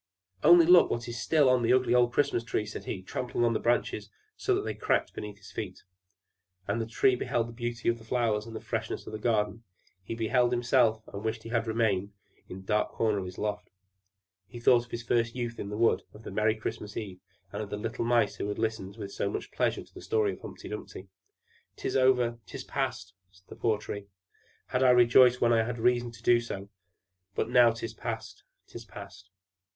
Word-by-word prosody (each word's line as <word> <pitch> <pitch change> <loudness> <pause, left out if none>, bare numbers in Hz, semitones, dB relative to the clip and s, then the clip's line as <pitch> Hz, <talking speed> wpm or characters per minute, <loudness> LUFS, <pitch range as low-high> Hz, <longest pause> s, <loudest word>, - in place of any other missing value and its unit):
"Only 170 +1 +8
look 175 +1 +7
what 120 0 -3
is 120 -1 -5
still 150 0 +3
on 130 -1 +4
the 120 +1 +3
ugly 130 -1 +3
old 120 -1 +4
Christmas 140 -3 +1
tree!" 110 -2 -2
said - - -7
he, 95 -3 -5
trampling 120 +4 -2
on 115 - +2
the - - 0
branches, 110 -3 0 0.3
so - - +1
that - - -1
they - - -3
all - - -18
cracked - - +1
beneath 105 -1 -7
his 100 -1 -14
feet. 95 -4 -6 0.8
And 105 +3 0
the 115 - -3
Tree 125 +2 +3
beheld 120 -1 0
all 115 - -9
the - - -14
beauty 120 -1 -4
of 115 0 +2
the - - -14
flowers, 110 -2 0
and 115 - -9
the - - -4
freshness 110 -2 -4
in - - -8
the 110 - -5
garden; 110 -1 0 0.4
he 115 - -5
beheld 120 +2 +2
himself, 120 -2 +2
and 100 +1 -6
wished 110 0 -3
he 115 - -8
had 115 -1 0
remained 105 -3 0 0.4
in - - -7
his 95 - -12
dark 105 +1 +1
corner 110 -3 +1
in 95 - -5
the 90 - -9
loft; 105 -1 -3 0.8
he 120 +5 -10
thought 120 0 +4
of - - -24
his 115 0 -5
first 115 0 0
youth 120 -2 -4
in 100 - -5
the 105 - -4
wood, 115 0 +3
of 105 - -13
the - - -7
merry 110 +1 +2
Christmas 110 -1 -6
eve, 95 -4 -6 0.3
and 105 - -3
of 105 - -6
the 105 - -4
little 115 +3 -3
Mice 115 -3 +2
who - - -3
had 105 - -3
listened 110 -3 -3
with 100 -3 -6
so 100 - -1
much - - -5
pleasure - - 0
to - - -23
the - - -10
story 105 -3 +1
of - - -11
Humpy - - -9
Dumpy. 95 +1 -8 0.7
"'Tis - - -3
over 125 -3 +3
'tis - - -7
past!" 90 +1 -3 0.2
said 90 0 -25
the - - -9
poor 110 -2 +1
Tree. 100 -1 -7 0.6
"Had 125 - 0
I 130 -1 +6
but - - +4
rejoiced 125 +1 +6
when 120 0 +4
I 115 - +4
had 120 +1 -4
reason 120 +1 +2
to 115 -1 -15
do 120 0 +5
so! 100 -4 -6 0.7
But 115 - -1
now 125 -1 +7
'tis 115 0 -5
past, - - -6 0.2
'tis 115 - -10
past!" 95 -2 -11
115 Hz, 230 wpm, -29 LUFS, 105-120 Hz, 0.8 s, Only